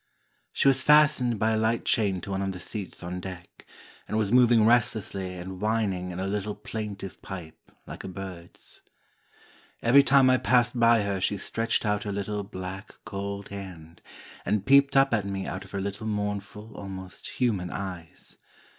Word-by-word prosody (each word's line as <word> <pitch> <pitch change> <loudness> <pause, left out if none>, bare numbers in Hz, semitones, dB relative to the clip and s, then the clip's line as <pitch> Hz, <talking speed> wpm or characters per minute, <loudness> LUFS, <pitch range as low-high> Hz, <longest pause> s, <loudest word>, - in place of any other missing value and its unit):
She - - +1
was 135 -1 +5
fastened 150 -6 +5
by 110 +2 +2
a 110 - +1
light 110 +1 0
chain 100 -5 +1
to 100 - -7
one 95 0 -1
of 95 -1 -2
the 90 - -8
seats 100 0 -5
on 90 +1 -4
deck, 90 -2 -10 0.4
and 110 - -2
was 105 -2 0
moving 120 -3 +6
restlessly 110 -5 +1
and 90 +1 -7
whining 105 -4 0
in 90 0 -6
a 95 - -2
little 105 +1 -2
plaintive 105 -3 -6
pipe 90 -5 -9
like - - -8
a - - -6
bird's. 90 -2 -8 1.0
Every 125 +5 +7
time 135 -1 +5
I 130 0 +5
passed 120 -1 +2
by 115 -2 +5
her 100 -2 -2
she 100 +2 0
stretched 115 +4 -1
out 105 0 +1
her 105 - -4
little, 100 +1 -3
black, 95 0 -7
cold 100 0 -5
hand, 90 -4 -9 0.4
and 105 -2 0
peeped 140 0 +5
up 135 -2 +5
at 105 -3 +1
me 95 -1 -3
out 95 +1 -5
of - - -15
her 100 - -4
little 100 +2 -4
mournful, 105 +1 -4
almost 95 -2 -8
human 105 -8 +1
eyes. 90 -4 -7
100 Hz, 175 wpm, -27 LUFS, 95-115 Hz, 1.0 s, Every